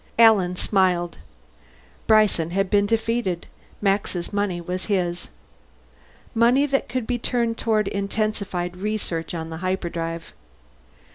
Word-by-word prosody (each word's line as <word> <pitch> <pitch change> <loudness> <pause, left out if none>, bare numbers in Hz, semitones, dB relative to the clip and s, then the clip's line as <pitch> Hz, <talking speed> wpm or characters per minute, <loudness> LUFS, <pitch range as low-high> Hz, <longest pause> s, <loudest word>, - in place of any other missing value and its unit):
Alan 210 -6 +6
smiled. 180 -3 +1 0.9
Bryson 215 -7 +4
had 195 +2 0
been 205 0 +4
defeated; 225 -5 0 0.4
Max's 195 -2 0
money 200 -3 0
was 180 +1 -4
his. 180 -4 -1 1.1
Money 240 +4 +4
that 275 -3 0
could 250 -1 -2
be 245 +1 -1
turned 235 -1 0
toward 215 -2 +1
intensified 200 -3 -2
research 185 -5 -3
on 165 0 -5
the 160 - -5
hyperdrive. 170 -2 -3
195 Hz, 115 wpm, -23 LUFS, 175-220 Hz, 1.1 s, Alan